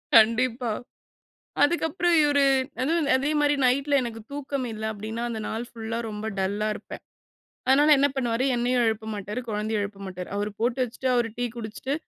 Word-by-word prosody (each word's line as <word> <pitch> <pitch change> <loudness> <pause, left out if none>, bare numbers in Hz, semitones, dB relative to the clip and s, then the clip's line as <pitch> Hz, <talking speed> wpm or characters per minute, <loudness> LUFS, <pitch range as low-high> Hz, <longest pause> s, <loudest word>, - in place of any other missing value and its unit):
கண்டிப்பா 230 +1 +4 0.9
அதுக்கப்புறம் 340 +2 +2
இவரு 285 -1 +4 0.4
அதுவும் 310 +1 +1
அதேமாரி 290 +1 +2
நைட்ல 280 +2 +3
எனக்கு 225 -2 -5
தூக்கம் 280 -2 -3
இல்ல 215 0 -6
அப்டின்னா, 220 +3 -5
அந்த 225 -2 -4
நாள் 230 +2 -3
ஃபுல்லா 230 0 -5
ரொம்ப 210 +1 -5
டல்லா 205 +3 0
இருப்பேன். - - -9 0.7
அதனால 290 +3 +6
என்ன 285 +1 +4
பண்ணுவாரு, 240 -1 0
என்னையும் 245 0 +2
எழுப்ப 220 0 -1
மாட்டாரு, 205 +4 -4
குழந்தைய 210 0 -1
எழுப்ப 200 0 -6
மாட்டாரு. 180 -1 -6
அவரு 205 0 -2
போட்டு 245 +2 0
வச்சுட்டு, 250 +2 -4
அவரு 235 -2 +1
டீ 245 - 0
குடிச்சிட்டு, 235 +5 -4
240 Hz, 155 wpm, -26 LUFS, 220-280 Hz, 0.9 s, அதனால